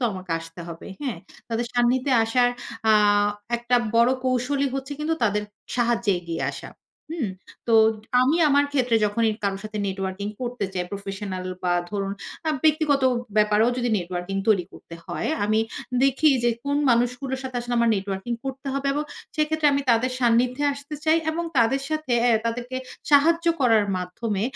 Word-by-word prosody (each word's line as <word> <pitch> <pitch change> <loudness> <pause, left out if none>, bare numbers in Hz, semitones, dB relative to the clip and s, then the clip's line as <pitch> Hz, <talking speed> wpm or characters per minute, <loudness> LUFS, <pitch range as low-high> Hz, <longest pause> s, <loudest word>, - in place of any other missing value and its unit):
তো - - +1
আমাকে 185 -2 -8
আসতে 165 +1 -11
হবে। 165 -1 -9 0.2
হ্যাঁ? 250 -11 -3 0.3
তাদের 230 +1 -1
সান্নিধ্যে 250 +2 +2
আসার 245 +2 +3 0.4
আ - - +7 0.6
একটা 240 +1 +1 0.2
বড় 235 +2 +5
কৌশলই 255 +2 +1
হচ্ছে 270 +1 -4
কিন্তু 320 +2 0
তাদের 210 -1 +1 0.3
সাহায্যে 235 -3 +2
এগিয়ে 170 -1 -4
আসা। - - -9 0.4
হুম? 300 - -2 0.4
তো 235 - 0 0.5
আমি 270 +6 +3
আমার 285 0 +4
ক্ষেত্রে 250 -4 +2
যখনই 220 +2 +1
কারো 195 -1 0
সাথে 215 0 -5
নেটওয়ার্কিং 195 +1 -3
করতে 245 -3 -3
চাই, 180 -2 -2
প্রফেশনাল 195 -1 -5 0.2
বা 180 -1 +1 0.2
ধরুন 195 -1 -2 0.3
আ - - +2 0.2
ব্যক্তিগত 305 -3 +3 0.3
ব্যাপারেও 210 +1 +4
যদি 245 -1 0
নেটওয়ার্কিং 180 +2 -4
তৈরি 195 -5 +4
করতে 170 - -12
হয়, - - -3 0.2
আমি 215 +1 +2 0.4
দেখি 275 +3 +4 0.2
যে 240 - +4
কোন 285 0 0
মানুষগুলোর 250 +3 0
সাথে 255 -1 -5
আসলে 240 0 -3
আমার 235 -1 +3
নেটওয়ার্কিং 195 +3 -4
করতে 270 +1 -6
হবে 275 0 -2
এবং 295 +1 -1 0.3
সেক্ষেত্রে 310 0 +1
আমি 280 0 +1
তাদের 235 +2 +2
সান্নিধ্যে 250 +3 +2
আসতে 285 +2 -8
চাই 320 +1 +4
এবং 335 +2 -3
তাদের 265 +4 +3
সাথে 310 -4 -2
আ - - +5 0.2
তাদেরকে 245 +2 -3 0.3
সাহায্য 330 +4 +4
করার 225 -5 +4
মাধ্যমে 190 +3 -3
240 Hz, 160 wpm, -24 LUFS, 205-275 Hz, 0.6 s, আ